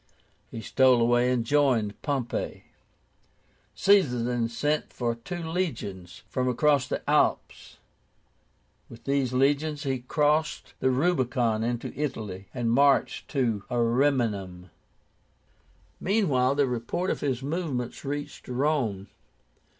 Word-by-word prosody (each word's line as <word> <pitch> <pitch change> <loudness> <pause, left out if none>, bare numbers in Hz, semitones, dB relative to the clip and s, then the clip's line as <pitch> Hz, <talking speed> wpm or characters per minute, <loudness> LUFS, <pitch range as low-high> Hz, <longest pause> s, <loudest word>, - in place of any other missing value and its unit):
He 115 - -7
stole 130 +2 +4
away, 120 +1 +3
and 120 -2 0
joined 125 -7 +1
Pompey. 135 -5 -3 1.1
Caesar 160 -13 +3
then 120 -1 0
sent 150 +6 -1
for 120 -2 -1
two 170 +10 -7
legions 110 - -4
from 125 +2 -1
across 140 +2 +2
the - - -4
Alps. - - 0 1.1
With 115 - -13
these 140 -2 0
legions 145 +3 +1
he 135 -2 -1
crossed 150 +5 0
the 130 - +2
RUBICON 125 -6 +1
into 120 0 -3
Italy, 110 -10 -4
and 120 -3 -1
marched 140 +3 +3
to 115 -8 -1
Ariminum. 115 - 0 1.3
Meanwhile 140 - +2
the 145 -1 +3
report 125 +9 -2
of - - -3
his 135 -3 -1
movements 140 -5 -3
reached 145 +1 -5
Rome. 125 -7 0
130 Hz, 110 wpm, -27 LUFS, 115-145 Hz, 1.3 s, stole